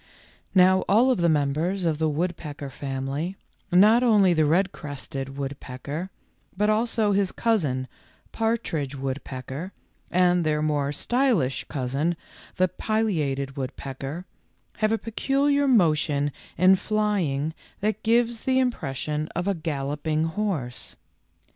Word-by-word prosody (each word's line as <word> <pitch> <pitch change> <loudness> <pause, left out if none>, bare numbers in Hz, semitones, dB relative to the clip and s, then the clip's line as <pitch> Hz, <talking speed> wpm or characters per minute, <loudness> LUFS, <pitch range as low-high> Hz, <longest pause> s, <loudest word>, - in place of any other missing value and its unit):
Now 185 0 +6
all 235 +7 +5
of 250 - +1
the 170 - +4
members 160 +6 +1
of 160 -2 0
the 160 -1 +2
woodpecker 150 -3 -3
family, 135 +6 -3 0.4
not 210 +7 +6
only 210 -7 +5
the 155 -2 +3
red 185 +5 +2
crested 135 -2 -6
woodpecker, 140 +4 -5 0.5
but 210 +2 +3
also 220 -1 +1
his 195 -1 +1
cousin, 150 - 0 0.4
partridge 200 - -1
woodpecker, 135 +5 -5 0.4
and 180 -1 +3
their 150 -1 +1
more 145 -2 0
stylish 225 - +1
cousin, 140 +6 -1 0.4
the 185 - +3
pilliated 160 -10 -1
wood 135 -1 -4
pecker, 135 +6 -6 0.5
have 215 0 +1
a 225 - +2
peculiar 280 +6 +1
motion 155 - +3 0.3
in 185 +2 +6
flying 185 -9 0 0.3
that 215 +1 -1
gives 230 0 +2
the 260 0 +1
impression 155 - -1
of 175 +2 -1
a 200 - +2
galloping 155 -1 -2
horse. 160 - -3
165 Hz, 120 wpm, -25 LUFS, 140-210 Hz, 0.5 s, Now